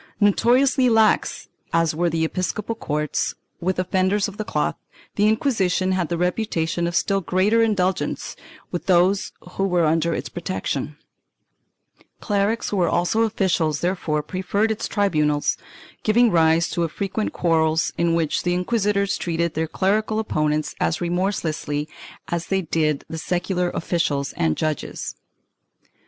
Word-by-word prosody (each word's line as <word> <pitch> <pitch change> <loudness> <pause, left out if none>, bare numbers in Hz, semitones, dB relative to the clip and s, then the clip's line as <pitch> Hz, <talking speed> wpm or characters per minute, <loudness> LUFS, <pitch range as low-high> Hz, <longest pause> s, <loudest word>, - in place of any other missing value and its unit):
Noto 205 +2 +3
riously 265 -1 +3
lax 220 -2 +2 0.2
as 165 -1 +2
were 170 +2 +1
the 160 0 0
episcopal 190 +6 -2
courts 150 -8 -2 0.2
with 185 +2 -1
offenders 185 +2 +1
of 200 0 -9
the 215 - -2
cloth, - - -1 0.4
the 205 +1 +2
Inquisition 195 -6 +1
had 185 -3 0
the 170 - -1
reputation 175 -2 -1
of 170 - -3
still 195 0 +1
greater 190 +7 +2
indulgence 190 -4 0 0.4
with 175 - -4
those 185 +2 +3 0.2
who 195 - -2
were 175 -3 +2
under 165 +1 +1
its - - -4
protection; 155 -5 -4 1.2
clerics 205 +2 0
who 205 - -2
were 175 -2 +2
also 175 +6 +1
officials 185 -8 +1
therefore 175 -4 -1
preferred 195 +6 -1
its 220 - -2
tribunals, 150 -8 +1 0.5
giving 235 +2 +4
rise 165 0 +4
to 170 -1 0
frequent 200 +5 -3
quarrels 160 -2 +1
in 170 -1 +1
which 160 -3 0
the 175 0 0
inquisitors 200 +1 0
treated 170 -1 -1
their 160 +1 -1
clerical 215 +5 0
opponents 155 -8 0
as 80 0 0
remorselessly. 170 -5 -1 0.4
as 170 -1 -2
they 190 -1 0
did 155 -3 0
the 160 - -5
secular 180 +1 -1
officials 160 -6 -1
and 80 -1 0
judges. 155 -2 -3
180 Hz, 140 wpm, -22 LUFS, 160-200 Hz, 1.2 s, giving